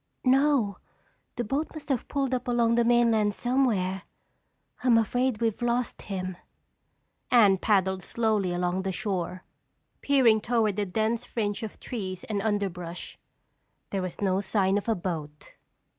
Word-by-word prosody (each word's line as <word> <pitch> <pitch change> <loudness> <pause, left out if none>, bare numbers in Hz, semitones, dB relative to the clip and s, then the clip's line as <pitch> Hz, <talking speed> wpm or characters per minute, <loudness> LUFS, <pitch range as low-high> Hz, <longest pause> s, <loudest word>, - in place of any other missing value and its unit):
"No, 265 -6 +3 0.6
the 240 - -2
boat 275 +8 -1
must 305 -1 -9
have 265 -4 -1
pulled 275 -2 -1
up 250 -1 -2
along 235 -1 +2
the 235 0 +3
mainland 230 -3 +3
somewhere. 225 -8 +1 0.8
I'm 245 -3 +5
afraid 245 +1 +1
we've 225 -1 -1
lost 240 0 -1
him." 185 -2 -5 0.9
Anne 205 -6 +5
paddled 190 -2 +2
slowly 215 -4 0
along 180 +1 -1
the 190 0 -2
shore, 185 -1 -3 0.6
peering 250 -6 +4
toward 220 -4 +1
the 205 -1 0
dense 220 +5 0
fringe 210 -2 -2
of 220 -2 -7
trees 190 -7 -5
and 205 -2 -2
underbrush. 185 -5 -3 0.7
There 195 - -1
was 185 +1 -5
no 190 0 +2
sign 195 -1 +1
of 205 - -6
a 225 - +3
boat. 160 -5 -6
215 Hz, 145 wpm, -27 LUFS, 190-240 Hz, 0.9 s, I'm